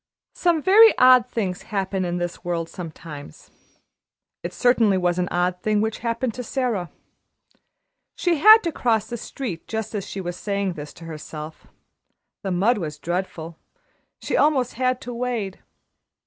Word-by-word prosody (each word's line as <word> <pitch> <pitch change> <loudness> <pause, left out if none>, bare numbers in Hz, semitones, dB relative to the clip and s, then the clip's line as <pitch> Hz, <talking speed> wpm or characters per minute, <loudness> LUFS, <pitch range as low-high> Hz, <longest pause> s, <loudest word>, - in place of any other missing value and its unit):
Some 335 -4 +1
very 440 +4 +7
odd 255 -1 +6
things 195 -6 -2
happen 195 -2 -2
in 175 0 -2
this 175 0 -4
world 170 -2 -2
sometimes. 160 -4 -10 0.9
It - - -5
certainly 230 -5 +3
was 180 -1 0
an 180 - 0
odd 180 +1 0
thing 215 -1 +1
which 220 +1 -1
happened 230 0 -2
to 250 - -6
Sara. 235 - -2 1.3
She 350 -2 +1
had 435 +6 +9
to 335 - -1
cross 225 -7 +1
the 240 - -5
street 225 -6 -6
just 220 -1 -4
as 205 -2 -2
she 195 - -7
was 175 -2 -4
saying 200 -1 -2
this 150 -2 -8
to 165 - -12
herself 155 -1 -8 0.7
the 195 - -3
mud 200 +6 +2
was 150 -4 -5
dreadful 170 -1 -4 0.6
she - - -2
almost 275 -5 +2
had 255 0 0
to 245 - -6
wade. 235 -5 -3
200 Hz, 155 wpm, -23 LUFS, 175-245 Hz, 1.3 s, had